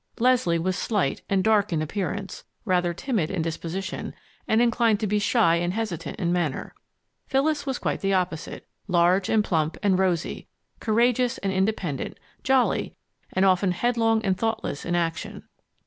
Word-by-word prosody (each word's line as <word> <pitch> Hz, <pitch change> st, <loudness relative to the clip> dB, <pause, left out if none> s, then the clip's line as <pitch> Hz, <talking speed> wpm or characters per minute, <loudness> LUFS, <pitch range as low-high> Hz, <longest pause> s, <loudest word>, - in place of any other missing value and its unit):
Leslie 240 Hz, -8 st, +3 dB
was 185 Hz, +3 st, -1 dB
slight 200 Hz, -11 st, -1 dB
and 195 Hz, -1 st, +2 dB
dark 215 Hz, -1 st, +3 dB
in 165 Hz, -, +1 dB
appearance, 195 Hz, +4 st, -4 dB, 0.2 s
rather 180 Hz, -3 st, +2 dB
timid 180 Hz, -, -1 dB
in 180 Hz, -5 st, -1 dB
disposition, 165 Hz, +3 st, -4 dB, 0.3 s
and 220 Hz, -, +3 dB
inclined 235 Hz, -2 st, +3 dB
to -, -, -1 dB
be 210 Hz, +1 st, +1 dB
shy 205 Hz, -5 st, +3 dB
and 175 Hz, +1 st, -1 dB
hesitant 220 Hz, -7 st, -4 dB
in 175 Hz, -3 st, 0 dB
manner. 170 Hz, -6 st, -2 dB, 0.5 s
Phyllis 290 Hz, +1 st, +1 dB
was 265 Hz, -2 st, -1 dB
quite -, -, -2 dB
the 195 Hz, -, +1 dB
opposite 180 Hz, -4 st, -2 dB, 0.2 s
large 180 Hz, +1 st, +3 dB
and 220 Hz, -1 st, +3 dB
plump 160 Hz, -4 st, 0 dB
and 190 Hz, -2 st, +3 dB
rosy, 180 Hz, -3 st, -1 dB, 0.3 s
courageous 240 Hz, +2 st, +2 dB
and 195 Hz, -1 st, -2 dB
independent, 190 Hz, -7 st, -1 dB, 0.2 s
jolly, 265 Hz, -2 st, +1 dB, 0.4 s
and 190 Hz, +1 st, +3 dB
often 185 Hz, 0 st, +3 dB
headlong 225 Hz, +1 st, +1 dB
and 190 Hz, -1 st, +2 dB
thoughtless 225 Hz, -10 st, -2 dB
in 175 Hz, -, 0 dB
action. 165 Hz, -1 st, -2 dB
195 Hz, 155 wpm, -25 LUFS, 175-225 Hz, 0.5 s, Leslie